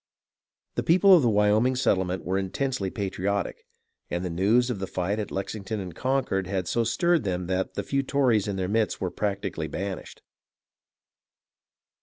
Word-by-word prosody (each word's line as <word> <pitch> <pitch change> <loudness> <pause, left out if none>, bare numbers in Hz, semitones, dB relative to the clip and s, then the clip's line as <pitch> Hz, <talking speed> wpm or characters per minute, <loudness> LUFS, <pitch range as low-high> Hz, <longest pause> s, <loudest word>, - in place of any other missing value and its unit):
The - - -1
people 185 +3 +6
of 170 - +5
the 120 - +3
Wyoming 105 +4 +3
settlement 95 -7 0
were 95 +2 0
intensely 100 +2 -2
patriotic, 100 0 -3 0.4
and 85 +1 -2
the 90 - -3
news 110 +8 +3
of 110 - -4
the 95 - -3
fight 95 +4 -2
at 105 - -3
Lexington 100 +2 -4
and 90 -3 -6
Con 135 0 0
cord 95 -1 -1
had 95 -2 -2
so 115 - +1
stirred 170 +8 +2
them 90 -3 -2
that 95 +1 -2
the - - -2
few 140 0 0
Tories 130 -7 +2
in 100 - -2
their 95 -1 -1
midst 110 +2 0
were 90 -2 -2
practically 100 -6 -2
banished. 95 +4 -6
100 Hz, 170 wpm, -26 LUFS, 95-120 Hz, 0.4 s, people